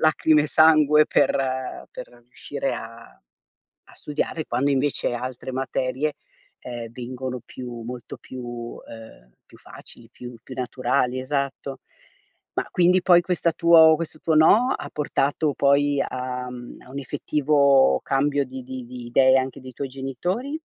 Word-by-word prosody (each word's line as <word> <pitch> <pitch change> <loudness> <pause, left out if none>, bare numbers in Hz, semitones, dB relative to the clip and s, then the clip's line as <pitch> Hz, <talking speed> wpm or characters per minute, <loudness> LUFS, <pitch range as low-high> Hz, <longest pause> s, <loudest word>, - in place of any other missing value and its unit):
lacrime 155 -1 +4
e 150 - -2
sangue 155 -1 +5
per - - +3 0.6
per - - -8 0.2
riuscire 125 - -4
a - - -11 0.7
a - - -18
studiare, 155 +2 -3
quando, 130 +4 0
invece, 140 -2 0
altre 125 +1 -6
materie, 130 +3 -2 0.5
ehm, 120 -2 -7
vengono 125 +1 -6
più 120 -2 -8
molto 120 +1 -8
più 130 -1 -9
uhm, 115 - -10
più - - -18
facili, 115 -1 -14
più 125 0 -10
più 130 - -10
naturali. 125 0 -1
Esatto. 140 0 -3 0.8
Ma, - - -2
quindi, 180 +1 +3
poi, 175 -1 +6
questa 175 -2 0
tuo 165 -1 +6
questo 155 -1 -6
tuo 160 - +1
no, 210 +11 +5
ha - - -8
portato 145 0 0
poi 140 +1 +2
a 125 0 -5
mhmm, 120 -1 -10
a 125 - -16
un 140 - -6
effettivo 140 - +2
cambio 140 +1 +1
di 130 0 -8
di 130 0 -7
di 125 -1 -9
idee 130 +2 +4
anche 130 0 -3
dei 130 0 -10
tuoi 135 +2 -5
genitori? 175 - -4
135 Hz, 145 wpm, -23 LUFS, 125-150 Hz, 0.8 s, poi